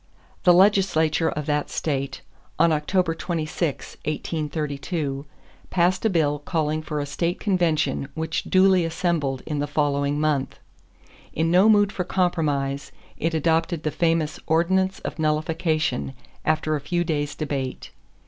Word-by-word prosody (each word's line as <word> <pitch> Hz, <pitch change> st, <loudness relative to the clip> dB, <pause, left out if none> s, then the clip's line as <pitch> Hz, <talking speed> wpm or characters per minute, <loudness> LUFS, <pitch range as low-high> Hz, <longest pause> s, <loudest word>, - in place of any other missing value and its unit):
_ -, -, -35 dB
The 180 Hz, -, +8 dB
legislature 175 Hz, -5 st, +3 dB
of 150 Hz, -1 st, -4 dB
that 150 Hz, -1 st, 0 dB
state, 140 Hz, -3 st, -2 dB, 0.4 s
on 170 Hz, -, +4 dB
October 165 Hz, +3 st, +1 dB
26, 165 Hz, -2 st, -3 dB
1832, 150 Hz, -2 st, -3 dB, 0.4 s
passed 180 Hz, +1 st, +2 dB
a -, -, +5 dB
bill 150 Hz, -5 st, +1 dB
calling 155 Hz, 0 st, -1 dB
for 155 Hz, -1 st, -4 dB
a 145 Hz, -, -2 dB
state 170 Hz, +5 st, -2 dB
convention 160 Hz, -8 st, +1 dB
which 160 Hz, 0 st, -2 dB
duly 185 Hz, -1 st, +4 dB
assembled 165 Hz, -5 st, -1 dB
in 150 Hz, -2 st, -3 dB
the 145 Hz, -, -1 dB
following 145 Hz, -1 st, 0 dB
month. 150 Hz, -3 st, 0 dB, 0.8 s
In 165 Hz, +1 st, +1 dB
no 185 Hz, +5 st, +6 dB
mood 205 Hz, -2 st, +5 dB
for 180 Hz, -, -2 dB
compromise, 150 Hz, -7 st, -1 dB, 0.3 s
it 165 Hz, +1 st, 0 dB
adopted 165 Hz, +1 st, +1 dB
the 155 Hz, -, 0 dB
famous 165 Hz, -2 st, 0 dB
Ordinance 190 Hz, +4 st, +2 dB
of -, -, -6 dB
Nullification 155 Hz, -3 st, 0 dB, 0.3 s
after 155 Hz, 0 st, +1 dB
a 145 Hz, -, -3 dB
few 175 Hz, +4 st, 0 dB
days' 145 Hz, -3 st, -2 dB
debate. 140 Hz, -4 st, -4 dB
160 Hz, 140 wpm, -24 LUFS, 145-175 Hz, 0.8 s, The